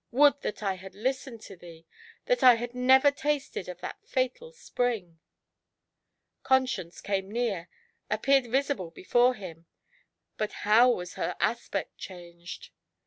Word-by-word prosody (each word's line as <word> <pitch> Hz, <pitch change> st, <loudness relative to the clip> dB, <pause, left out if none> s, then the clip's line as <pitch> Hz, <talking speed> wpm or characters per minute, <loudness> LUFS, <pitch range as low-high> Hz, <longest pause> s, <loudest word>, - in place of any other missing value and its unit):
would 285 Hz, +2 st, +4 dB
that 210 Hz, -, -4 dB
I 195 Hz, -2 st, -1 dB
had 190 Hz, +1 st, -11 dB
listened 255 Hz, 0 st, -3 dB
to 200 Hz, -, -11 dB
thee, 165 Hz, -2 st, -14 dB, 0.4 s
that -, -, +1 dB
I 250 Hz, -1 st, +9 dB
had 240 Hz, +1 st, -5 dB
never 265 Hz, +3 st, +5 dB
tasted 280 Hz, -9 st, -2 dB
of 180 Hz, 0 st, -8 dB
that -, -, -6 dB
fatal 260 Hz, -, -2 dB
spring 235 Hz, -, -3 dB, 0.6 s
!" -, -, -56 dB
Conscience, 250 Hz, -10 st, 0 dB
ever 195 Hz, -1 st, 0 dB
near, 210 Hz, -5 st, -2 dB, 0.4 s
appeared 260 Hz, +4 st, +2 dB
visible 265 Hz, -, -1 dB
before 245 Hz, +9 st, +2 dB
him; 170 Hz, -5 st, -10 dB, 0.7 s
but 215 Hz, -1 st, -2 dB
how 225 Hz, +4 st, +6 dB
was 180 Hz, -7 st, -2 dB
her -, -, -3 dB
aspect 220 Hz, -3 st, -2 dB
changed 175 Hz, -1 st, -10 dB
230 Hz, 140 wpm, -28 LUFS, 185-260 Hz, 0.7 s, I